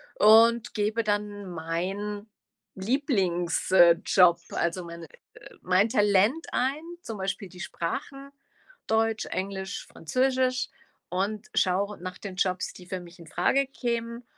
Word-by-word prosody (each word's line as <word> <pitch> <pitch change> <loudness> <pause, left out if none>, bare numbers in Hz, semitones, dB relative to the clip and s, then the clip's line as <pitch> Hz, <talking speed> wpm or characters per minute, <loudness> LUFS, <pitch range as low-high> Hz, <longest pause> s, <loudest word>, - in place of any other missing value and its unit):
und 230 +2 +6
gebe 215 +2 0
dann 205 -1 -2
meinen 190 +6 -4 0.5
Lieblings 190 - 0
äh, 175 -2 +8
Job, 180 -3 +5
also, 170 +2 -1
mein 170 0 -9 0.6
mein 185 +4 +3
Talent 210 - +3
ein, 270 +4 0 0.2
zum 225 -8 -6
Beispiel 195 +1 -3
die 180 - -14
Sprachen, 275 - -5 0.6
Deutsch, 225 0 +1
Englisch, 190 0 -4
Französisch, 255 +7 0 0.4
und 205 +4 -2
schaue 200 +2 +1
nach 185 0 -6
den 195 -1 -8
Jobs, 185 -1 0
die 180 - -13
für 185 0 -4
mich 175 0 -14
infrage 175 - +1
kämen, 235 -2 -3
205 Hz, 120 wpm, -27 LUFS, 185-230 Hz, 0.6 s, äh